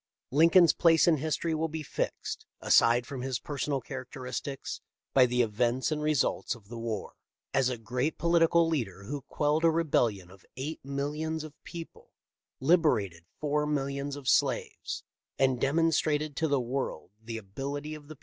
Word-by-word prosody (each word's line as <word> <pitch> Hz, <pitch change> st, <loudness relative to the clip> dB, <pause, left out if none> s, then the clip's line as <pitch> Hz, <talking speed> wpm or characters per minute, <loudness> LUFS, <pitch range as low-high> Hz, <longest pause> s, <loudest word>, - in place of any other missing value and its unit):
Lincoln's 165 Hz, +4 st, +6 dB
place 165 Hz, 0 st, +4 dB
in 165 Hz, -2 st, +5 dB
history 160 Hz, +3 st, -1 dB
will 160 Hz, +1 st, 0 dB
be 160 Hz, 0 st, -5 dB
fixed -, -, -4 dB
— -, -, -60 dB
aside 120 Hz, +1 st, +4 dB
from 135 Hz, -1 st, -6 dB
his 130 Hz, -1 st, -1 dB
personal 145 Hz, 0 st, -2 dB
characteristics 130 Hz, 0 st, -6 dB, 0.2 s
— -, -, -63 dB
by 130 Hz, -2 st, +6 dB
the 125 Hz, 0 st, +2 dB
events 120 Hz, +5 st, 0 dB
and 150 Hz, -1 st, -1 dB
results 150 Hz, -3 st, +1 dB
of 105 Hz, -4 st, -18 dB
the 120 Hz, -, -7 dB
war. 115 Hz, -3 st, -4 dB, 0.4 s
As 135 Hz, -2 st, +3 dB
a 125 Hz, -, -3 dB
great 125 Hz, +7 st, -2 dB
political 170 Hz, 0 st, +4 dB
leader 110 Hz, -, -2 dB
who 140 Hz, +7 st, -5 dB
quelled 150 Hz, +4 st, 0 dB
a 165 Hz, -, +6 dB
rebellion 120 Hz, -, +1 dB
of 95 Hz, -1 st, -17 dB
eight 150 Hz, +5 st, -5 dB
millions 150 Hz, +3 st, -3 dB
of 155 Hz, -2 st, -9 dB
people, 170 Hz, -2 st, -9 dB, 0.5 s
liberated 125 Hz, -, +2 dB
four 150 Hz, 0 st, 0 dB
millions 140 Hz, -1 st, -2 dB
of 140 Hz, -3 st, -9 dB
slaves, -, -, 0 dB, 0.3 s
and 130 Hz, -2 st, +2 dB
demonstrated 155 Hz, 0 st, +1 dB
to 160 Hz, -, +1 dB
the 140 Hz, -2 st, +2 dB
world 125 Hz, -, -3 dB
the 115 Hz, 0 st, -5 dB
ability 140 Hz, +9 st, -5 dB
of 150 Hz, -1 st, -10 dB
the. 155 Hz, -, -9 dB
140 Hz, 165 wpm, -29 LUFS, 125-155 Hz, 0.5 s, Lincoln's